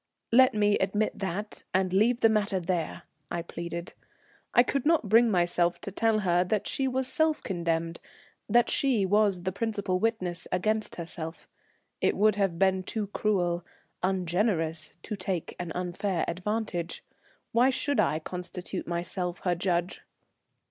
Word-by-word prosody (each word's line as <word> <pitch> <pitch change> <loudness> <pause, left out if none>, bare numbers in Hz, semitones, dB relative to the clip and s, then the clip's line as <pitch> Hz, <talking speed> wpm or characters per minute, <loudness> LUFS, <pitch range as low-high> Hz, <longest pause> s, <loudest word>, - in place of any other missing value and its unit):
"Let 255 +1 +6
me 205 -1 +3
admit 205 +3 0
that, 195 +2 -4
and 185 -1 +1
leave 230 +5 +3
the - - +7
matter 210 -3 +1
there," 170 -2 -2 0.3
I 170 -1 -3
pleaded. 170 0 -6 0.6
I 240 - +6
could 275 +1 -1
not 315 -7 +3
bring 230 +2 +6
myself 175 -2 +2
to 200 - -5
tell 220 +2 +2
her 175 -2 +3
that 200 +3 -1
she 270 -2 -1
was 260 0 0
self 310 +4 +1
condemned, 170 -2 -1 0.5
that 240 +3 +5
she 250 -8 +2
was 200 -2 +2
the 185 - -1
principal 200 -2 -1
witness 185 -6 0
against 215 +4 0
herself. 165 -1 -7 0.5
It - - +2
would 215 +1 +5
have 195 -4 0
been 190 0 +3
too 205 +2 -4
cruel, 175 -5 +1 0.4
ungenerous, 175 -3 0
to 215 - -4
take 185 -3 -3
an 175 -2 -4
unfair 180 0 -1
advantage. 180 -1 -3 0.5
Why 245 +3 +4
should 270 -1 0
I 155 -7 +3
constitute 180 +2 -6
myself 175 +1 -3
her 180 -2 +1
judge? 175 0 -1
190 Hz, 150 wpm, -28 LUFS, 175-215 Hz, 0.6 s, the